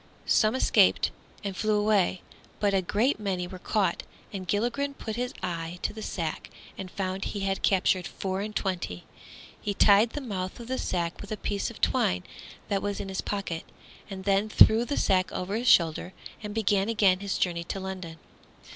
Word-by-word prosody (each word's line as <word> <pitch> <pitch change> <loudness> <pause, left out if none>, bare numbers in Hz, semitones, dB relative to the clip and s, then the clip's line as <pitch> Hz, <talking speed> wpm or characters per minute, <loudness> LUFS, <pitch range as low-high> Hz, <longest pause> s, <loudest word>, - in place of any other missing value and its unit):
Some 215 +3 +3
escaped 260 - +4 0.3
and 200 -2 -3
flew 215 +1 +1
away, 205 -4 +2 0.4
but 205 -1 +2
a 195 - +3
great 215 +8 +1
many 190 -4 -2
were 180 +1 -9
caught, 190 -3 0 0.3
and 190 -2 -5
Gilligren 245 +8 0
put 220 -5 -5
his 245 +1 -2
eye 170 -1 -3
to - - -1
the 220 - -8
sack 165 -6 -4 0.3
and 190 - -7
found 190 +1 -3
he 205 - -4
had 195 0 -1
captured 185 -2 +2
four 190 0 -3
and 210 +1 -5
twenty. 175 - -2 0.6
He 205 -1 -2
tied 210 +3 +5
the - - -3
mouth 195 -8 -4
of 235 - -7
the 260 - -1
sack 170 -2 -2
with 205 - -9
a 215 - -2
piece 205 -1 -2
of 235 - -12
twine 90 - +2 0.4
that 200 -1 0
was 205 -1 -2
in 195 - -5
his 190 - -2
pocket, 195 -5 -3 0.5
and 190 -1 -6
then 200 +2 +2
threw 220 +2 +6
the 285 - -2
sack 185 -1 +2
over 185 +3 -3
his 240 +3 -2
shoulder 170 +2 +4 0.3
and 210 -1 -6
began 205 -1 +2
again 200 -5 +3
his 200 -1 -2
journey 170 -2 0
to 195 - -4
London. 185 -4 -6
195 Hz, 190 wpm, -28 LUFS, 185-215 Hz, 0.6 s, threw